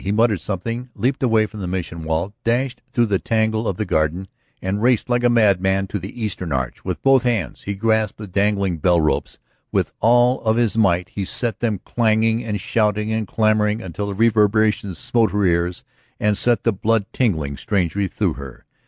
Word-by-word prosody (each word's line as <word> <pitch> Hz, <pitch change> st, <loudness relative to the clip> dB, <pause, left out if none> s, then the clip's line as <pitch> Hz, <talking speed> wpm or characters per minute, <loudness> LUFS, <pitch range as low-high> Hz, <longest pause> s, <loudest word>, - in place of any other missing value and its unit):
He 95 Hz, -, -1 dB
muttered 110 Hz, -3 st, +2 dB
something, 115 Hz, +6 st, -4 dB
leaped 130 Hz, +6 st, -1 dB
away 115 Hz, -4 st, +3 dB
from 110 Hz, 0 st, -10 dB
the 95 Hz, -, -4 dB
Mission 85 Hz, -2 st, -4 dB
wall, 80 Hz, +5 st, -2 dB
dashed 125 Hz, +2 st, 0 dB
through 120 Hz, -1 st, +2 dB
the 100 Hz, -4 st, 0 dB
tangle 110 Hz, 0 st, 0 dB
of 95 Hz, -, -2 dB
the 110 Hz, -, -2 dB
garden, 85 Hz, +3 st, -1 dB, 0.3 s
and 95 Hz, +2 st, -2 dB
raced 125 Hz, 0 st, +2 dB
like 120 Hz, 0 st, +1 dB
a 120 Hz, -, +4 dB
madman 95 Hz, -4 st, +3 dB
to 100 Hz, -, -3 dB
the 100 Hz, +7 st, -9 dB
eastern 95 Hz, -6 st, -3 dB
arch. 65 Hz, -2 st, -3 dB
With -, -, -4 dB
both 135 Hz, -1 st, +5 dB
hands 120 Hz, -4 st, -1 dB
he 100 Hz, -, -3 dB
grasped 110 Hz, 0 st, 0 dB
the 105 Hz, -, -7 dB
dangling 100 Hz, -2 st, 0 dB
bell 85 Hz, +2 st, +3 dB
ropes, 75 Hz, -1 st, -1 dB, 0.3 s
with -, -, 0 dB
all 120 Hz, +3 st, +4 dB
of 110 Hz, 0 st, +1 dB
his 120 Hz, -3 st, +1 dB
might 90 Hz, -5 st, +2 dB
he 100 Hz, -, -4 dB
set 115 Hz, +4 st, -2 dB
them 110 Hz, -5 st, -1 dB
clanging 115 Hz, 0 st, +1 dB
and 105 Hz, -3 st, -3 dB
shouting 105 Hz, +1 st, 0 dB
and 110 Hz, -2 st, -2 dB
clamoring 110 Hz, 0 st, +1 dB
until 100 Hz, 0 st, -5 dB
the 100 Hz, -, -4 dB
reverberation 110 Hz, -2 st, +2 dB
smote 115 Hz, +6 st, +1 dB
her 105 Hz, -1 st, +1 dB
ears 85 Hz, 0 st, 0 dB, 0.4 s
and 105 Hz, 0 st, +2 dB
set 120 Hz, +3 st, +1 dB
the 115 Hz, -, +2 dB
blood 110 Hz, +1 st, +1 dB
tingling 80 Hz, -, 0 dB
strangely 95 Hz, +4 st, -1 dB
through -, -, -1 dB
her. 70 Hz, -2 st, -10 dB
105 Hz, 195 wpm, -21 LUFS, 95-115 Hz, 0.4 s, both